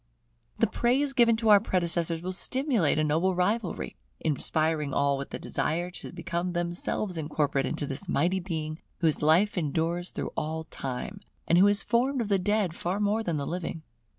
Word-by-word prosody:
The - - +4
praise 255 +6 +1
given 235 -3 +5
to 225 -1 +1
our 205 -1 +9
predecessors 170 -4 -1
will 185 +1 -2
stimulate 240 - +1
a 155 - +2
noble 165 +5 +1
rivalry; 195 +2 -1 0.2
inspiring 155 -1 0
all 140 0 +3
with 140 0 -5
the - - -5
desire 175 +3 -2
to - - -8
become 175 +1 -3
themselves 175 +1 -1
incorporate 145 -3 0
into 145 - -3
this 145 +7 -5
mighty 180 +2 +2
Being 160 -3 -4 0.2
whose 160 -3 +2
life 175 +6 +4
endures 165 +3 -1
through - - -5
all 160 +1 -2
time, 135 +5 -5 0.3
and 170 - +5
who 195 - +7
is 205 0 +2
formed 255 +3 +1
of 225 -3 -2
the 200 -1 +3
dead 200 -2 0
far 180 +4 -2
more 210 +2 +1
than 170 -7 -1
the 140 - -2
living. 165 -1 -4
175 Hz, 180 wpm, -28 LUFS, 155-205 Hz, 0.3 s, our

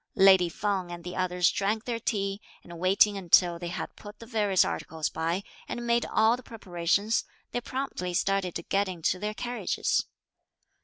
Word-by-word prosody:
Lady 190 -2 +6
Feng 195 -2 -2
and 175 0 -7
the 180 +1 -6
others 180 -1 +2
drank 215 +3 -1
their 235 -2 -2
tea, 200 -3 -2 0.2
and 170 -1 -10
waiting 195 +3 +4
until 175 -1 +4
they 175 - -5
had 175 - -5
put 210 0 -11
the 230 - -11
various 210 -5 +2
articles 160 -1 -3
by, 165 +4 -2 0.2
and 240 - -4
made 235 0 +2
all 220 +2 +4
the 250 - -10
preparations, 200 -1 0 0.3
they 245 - -2
promptly 255 -9 -4
started 190 0 0
to - - -4
get 200 0 +1
into 180 0 -1
their 210 +1 -3
carriages. 245 +1 -1
195 Hz, 170 wpm, -28 LUFS, 180-220 Hz, 0.3 s, Lady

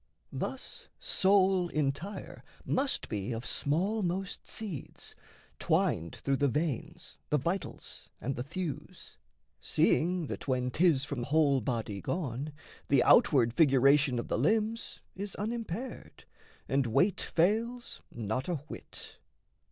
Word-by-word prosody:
Thus - - -4
soul 190 - +3
entire 155 +5 -3 0.2
must 270 +1 0
be 105 +1 -3
of 115 +2 -5
smallmost 185 +4 -1
seeds, 195 -11 -5 0.5
Twined 85 +1 +1
through 135 -1 0
the 145 - +3
veins, 155 +4 -2
the 150 - +3
vitals, 170 +7 -4
and 135 +2 -2
the - - -3
thews, 160 +3 -6 0.4
Seeing 175 +1 +2
that, - - -6
when 125 -1 +1
'tis 155 -3 +3
from 140 -3 -4
whole 140 0 +3
body 110 -4 -2
gone, 145 -4 -3 0.4
The 140 -3 +4
outward 120 -5 +5
figuration 140 -2 +5
of 120 - -3
the - - 0
limbs 220 +1 0
Is 200 +1 -5
unimpaired 230 +2 -5 0.4
and 135 -2 +2
weight 180 - +3
fails 225 +8 0
not 115 +3 -2
a 175 - +1
whit. 150 +1 -8
155 Hz, 120 wpm, -31 LUFS, 130-190 Hz, 0.5 s, outward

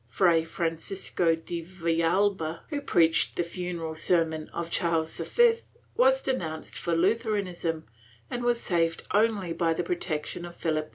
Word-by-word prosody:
Fray 165 +3 +4
Francisco 165 +1 -1
de 170 +1 -5
Villalba, 170 0 0
who 290 -2 -2
preached 165 -11 +3
the 175 - +1
funeral 170 -2 -4
sermon 160 -1 0
of 170 0 -4
Charles 165 -2 0
V, 475 -1 +3 0.4
was - - +4
denounced 160 -12 -3
for 170 -1 -1
Lutheranism 185 -4 0 0.4
and 245 - -4
was 240 -1 +2
saved 165 -4 0
only 205 -5 +2
by 165 -1 +1
the 175 - -1
protection 170 -2 -3
of 175 0 -8
Philip 155 -2 -1
11. - - -21
170 Hz, 145 wpm, -28 LUFS, 165-195 Hz, 0.4 s, Fray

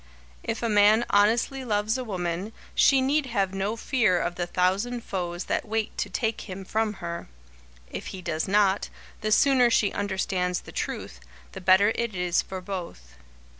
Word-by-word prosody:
If - - -4
a - - +2
man 210 +2 +5
honestly 230 +6 +3
loves 215 -1 0
a 260 - -2
woman, 185 -1 -3 0.2
she 270 -1 +5
need 275 +2 +1
have 195 -6 0
no 195 +3 -1
fear 230 -6 +2
of 175 - -1
the 175 0 -3
thousand 195 +8 0
foes 175 -2 -3
that - - -1
wait 220 0 -2
to - - -1
take 225 -3 -2
him 190 +1 -6
from 220 +1 0
her. 170 0 -5 0.6
If - - -6
he 190 - -6
does 160 -2 -2
not, 200 0 +2 0.3
the 215 0 -1
sooner 255 +1 +5
she 215 -3 +2
understands 190 -2 -1
the - - -12
truth, 60 - -4 0.3
the - - -8
better 190 +3 +5
it 235 -3 -2
is 180 -1 +1
for 190 -1 -7
both. 175 - -7
205 Hz, 170 wpm, -26 LUFS, 180-225 Hz, 0.6 s, man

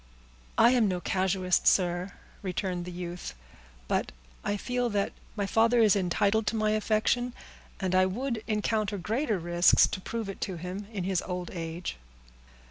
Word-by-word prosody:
"I 240 - +7
am 240 -4 +4
no 180 -2 -1
casuist, 185 -1 +1
sir," 180 0 +2 0.3
returned 180 -2 -2
the 180 - -6
youth; 175 - -6 0.5
"but - - 0 0.3
I 205 - -1
feel 245 +3 -1
that 205 -2 0 0.2
my 205 -2 -1
father 225 +4 +3
is 215 -3 +6
entitled 200 +3 +1
to - - +1
my 215 -1 +2
affection, 220 +3 +1 0.5
and 190 -2 -1
I 185 0 +5
would 235 +3 -3
encounter 215 -1 0
greater 220 - 0
risks 175 +1 +5
to 190 - -5
prove 225 +1 -4
it 195 - -7
to 190 - -2
him 180 +4 -6
in 200 -5 -3
his 185 -1 0
old 180 -2 -4
age." 165 - -5
195 Hz, 160 wpm, -29 LUFS, 180-220 Hz, 0.5 s, I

